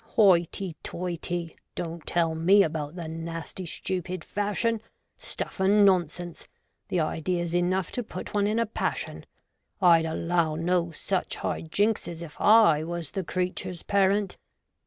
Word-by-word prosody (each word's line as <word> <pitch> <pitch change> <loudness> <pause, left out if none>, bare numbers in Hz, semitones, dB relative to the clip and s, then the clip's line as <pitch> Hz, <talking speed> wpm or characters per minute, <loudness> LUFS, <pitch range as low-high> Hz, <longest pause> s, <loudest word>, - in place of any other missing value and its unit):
Hoity 185 -3 +3
toity! 175 -1 -4
— - - -52
don't 165 -1 -5
tell 165 -2 +1
me 185 +5 +5
about 155 -1 -3
the 170 -3 -5
nasty 165 +2 -6
stupid 185 +2 -3
fashion! 210 +2 0 0.4
Stuff - - -5
and 200 +2 +5
nonsense! 175 -2 0 0.2
— - - -50
the 180 - +1
idea's 170 +2 -1
enough 180 +1 +1
to 250 - -2
put - - -7
one 205 -1 +2
in 215 +2 0
a 230 - +2
passion. 220 - -3 0.5
I'd 165 -2 +6
allow 165 0 0
no 170 +1 +1
such 180 +3 -2
high - - -2
jinkses, 175 -1 -1
if 160 - -10
I 210 -8 +6
was 170 -2 -5
the 190 - -2
creatures' 180 0 -3
parent. 200 0 +2
175 Hz, 145 wpm, -27 LUFS, 165-195 Hz, 0.5 s, I'd